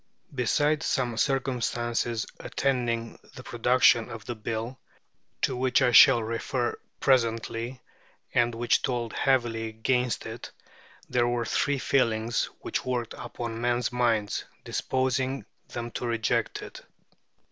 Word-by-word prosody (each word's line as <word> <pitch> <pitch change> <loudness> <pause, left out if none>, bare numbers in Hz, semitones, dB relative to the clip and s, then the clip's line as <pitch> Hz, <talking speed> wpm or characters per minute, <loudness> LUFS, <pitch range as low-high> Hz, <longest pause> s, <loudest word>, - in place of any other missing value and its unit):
Besides 145 +5 +1
some 120 -3 0
circumstances 120 -3 0
attending 120 -4 -1 0.2
the 125 - -9
production 120 -1 +3
of 115 -2 -8
the 120 - -3
Bill, 115 +3 -4 0.6
to 130 - +2
which 125 0 +2
I 125 - +4
shall 120 0 +8
refer 120 +2 -2 0.2
presently, 115 -1 +1 0.5
and 120 -1 +2
which 120 +1 +2
told 120 -3 -2
heavily 120 -4 +1
against 125 +2 0
it, - - -7 0.6
there 120 -1 +2
were 120 -1 0
three 145 +5 +1
feelings 115 -4 +1 0.2
which - - -2
worked 125 -2 -2
upon 115 -1 -6
men's 120 0 +1
minds, 115 -4 +1 0.2
disposing 130 +1 -1 0.2
them 120 0 -5
to 120 - -4
reject 115 -2 0
it. - - -10
120 Hz, 120 wpm, -27 LUFS, 115-130 Hz, 0.6 s, shall